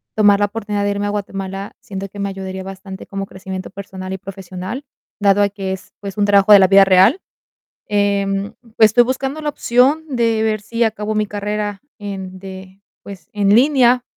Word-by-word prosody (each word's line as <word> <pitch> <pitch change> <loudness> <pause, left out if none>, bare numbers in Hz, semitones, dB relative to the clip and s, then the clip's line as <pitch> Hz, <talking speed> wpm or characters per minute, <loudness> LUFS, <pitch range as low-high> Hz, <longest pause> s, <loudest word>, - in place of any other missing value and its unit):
tomar 205 -2 +5
la 205 - +3
oportunidad 205 -1 -3
de 205 - +1
irme 200 0 -2
a 205 - -1
Guatemala, 195 -1 -5
siento 195 0 -7
que 205 - -11
me 200 0 -1
ayudaría 190 -1 -6
bastante, 190 0 -9
como 195 0 -4
crecimiento 190 -1 -7
personal 190 -1 -8
y 190 - -3
profesional, 190 +5 -7 0.4
dado 200 0 +4
a 200 - +3
que 195 -1 -5
es, 190 - -7
pues, 200 0 -7
un 205 - +2
trabajo 200 0 +4
de 200 - +10
la 190 - +6
vida 195 +1 +7
real. 195 - +5 0.7
Em, 200 -1 0 0.2
estoy 220 +2 +6
buscando 265 +4 -3
la 300 - -1
opción, 270 +3 +2
de 230 -3 +1
ver, 215 -1 0
si 230 +2 -1
acabo 215 -1 -2
mi 215 - +1
carrera, 205 0 -4 0.2
en 190 -2 -6
de 190 0 -11 0.2
pues, 190 -5 -11
en 205 0 +3
línea. 250 -2 +4
200 Hz, 185 wpm, -18 LUFS, 195-215 Hz, 0.7 s, de